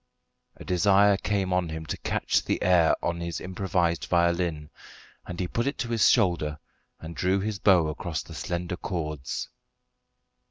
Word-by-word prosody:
A - - -11
desire 100 +2 +4
came 95 -1 -1
on 90 -2 0
him 80 0 -6
to - - -4
catch - - 0
the - - -1
air 90 -3 +4
on 85 0 -1
his 85 -1 -4
improvised 90 -3 -1
violin, 85 -3 0 0.6
and 85 - -6
he 90 - -1
put 115 +7 -2
it 140 - -2
to 120 - -3
his 115 -2 +4
shoulder 85 - +2 0.4
and 80 +1 -8
drew 95 +2 +1
his 105 0 -3
bow 90 -5 +4
across 80 +1 -4
the - - -12
slender 90 0 -4
cords. 75 -8 -4
90 Hz, 160 wpm, -26 LUFS, 85-95 Hz, 0.6 s, desire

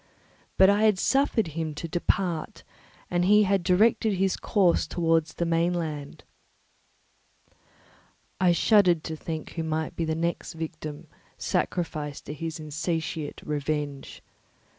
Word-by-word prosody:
But 190 - +7
I 205 +2 +4
had 210 -3 +4
suffered 255 - +2
him 155 -1 -4
to 165 - -5
depart, 175 -1 -1 0.5
and 175 0 +2
he 210 +3 +5
had 195 -1 +2
directed 210 +4 +3
his 190 0 +1
course 185 -6 +2
towards 165 -2 +1
the 170 - -1
mainland. 165 -3 -1 2.2
I 180 -2 +4
shuddered 175 -2 +4
to 160 - -4
think 160 0 -6
who 165 - -4
might 160 0 -2
be 165 - -1
the 160 0 -1
next 170 +1 -2
victim 155 -2 -6 0.3
sacrificed 150 -5 -2
to - - -5
his 160 +2 -5
insatiate 155 0 -3
revenge. 145 -1 -3
165 Hz, 125 wpm, -26 LUFS, 155-185 Hz, 2.2 s, But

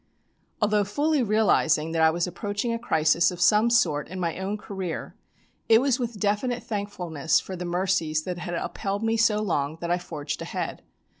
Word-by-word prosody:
Although 210 0 +3
fully 290 +8 +1
realising 195 -8 +2
that 165 0 0
I 160 - +6
was 170 +1 0
approaching 205 +5 -3
a 230 - -2
crisis 160 -6 +3
of 180 -2 -7
some 215 +5 +4
sort 150 -11 +2
in 185 +2 -7
my 170 0 -2
own 195 +2 -2
career, 190 -5 -5 0.6
it 225 0 +7
was 265 -1 +1
with 235 -4 -4
definite 220 +4 0
thankfulness 180 -8 -1
for 190 - -7
the 180 0 -5
mercies 175 -3 0
that 180 0 -4
had 175 0 -4
upheld 200 +4 -3
me 225 0 +1
so 220 -2 +3
long 155 -5 -1
that 170 0 -3
I 175 - +2
forged 155 -4 -5
ahead. - - -4
190 Hz, 180 wpm, -26 LUFS, 170-215 Hz, 0.6 s, it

